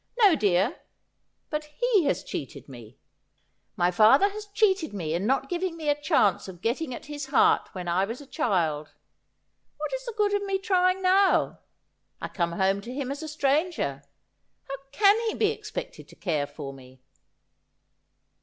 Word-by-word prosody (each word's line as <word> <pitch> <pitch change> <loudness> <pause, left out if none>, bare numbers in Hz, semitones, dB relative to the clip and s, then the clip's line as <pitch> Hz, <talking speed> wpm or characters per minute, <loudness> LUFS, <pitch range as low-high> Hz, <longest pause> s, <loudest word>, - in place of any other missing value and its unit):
No, 415 -7 +6
dear; 205 - +1 0.7
but 300 -1 -2
he 405 +4 +1
has 180 - 0
cheated 135 - -7
me. 120 -4 -12 0.8
My 175 +1 +2
father 225 - +6
has 420 +1 -8
cheated 395 - +1
me 160 -5 -3
in 180 +5 -1
not 270 +1 +1
giving 350 0 -2
me 310 -2 -2
a 290 0 +1
chance 210 - +2
of 180 -2 -10
getting 255 +6 -1
at 240 - -7
his 290 -1 -6
heart 275 - +3
when 180 -2 -6
I 180 +3 +2
was 230 +4 -6
a 285 - -11
child. 170 - -1 0.8
What - - -4
is - - -3
the 475 -3 -6
good 415 -1 +2
of 405 - +1
my 390 0 +1
trying 375 -1 +1
now? 380 +1 +3 0.6
I - - -5
come 170 -2 -2
home 195 +2 +1
to 235 - -8
him 270 0 -4
as 285 +2 -5
a 315 - -5
stranger. 290 - 0 0.7
How 275 - -4 0.2
can 405 +7 +5
he - - -3
be 425 0 +2
expected 440 0 -7
to - - -15
care 155 -7 -1
for 145 -1 -8
me 130 -1 -16
280 Hz, 175 wpm, -26 LUFS, -, 0.8 s, No